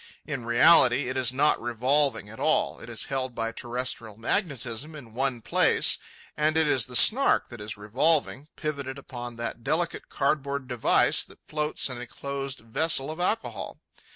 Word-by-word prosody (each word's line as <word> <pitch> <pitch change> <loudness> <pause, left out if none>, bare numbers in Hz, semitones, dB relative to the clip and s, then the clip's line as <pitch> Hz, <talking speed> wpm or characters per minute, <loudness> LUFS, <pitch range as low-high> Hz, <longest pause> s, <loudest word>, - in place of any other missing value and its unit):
In 140 -6 -5
reality, 125 0 +5
it 130 - -4
is 130 -2 +2
not 145 +4 +2
revolving 125 +2 +1
at 110 +2 -12
all. - - 0
It - - -10
is - - -1
held 130 -2 -3
by 115 0 -2
terrestrial 120 -2 -4
magnetism 135 - -2
in 120 -7 -12
one 130 -1 -1
place, - - +3 0.4
and 155 +1 +1
it 160 - +4
is 130 -5 +1
the 125 - -6
Snark 265 - +5
that 120 -3 -10
is 105 0 -6
revolving, 135 +7 0
pivoted 140 -3 -4
upon 120 -3 -8
that 115 0 -6
delicate 170 +5 -2
cardboard 140 -1 -1
device 125 -3 +3
that - - -19
floats 150 0 -1
in 125 -2 -6
a 125 - -8
closed 140 0 -5
vessel 135 +5 0
of 160 - -8
alcohol. 215 +5 -3
130 Hz, 165 wpm, -26 LUFS, 120-150 Hz, 0.4 s, reality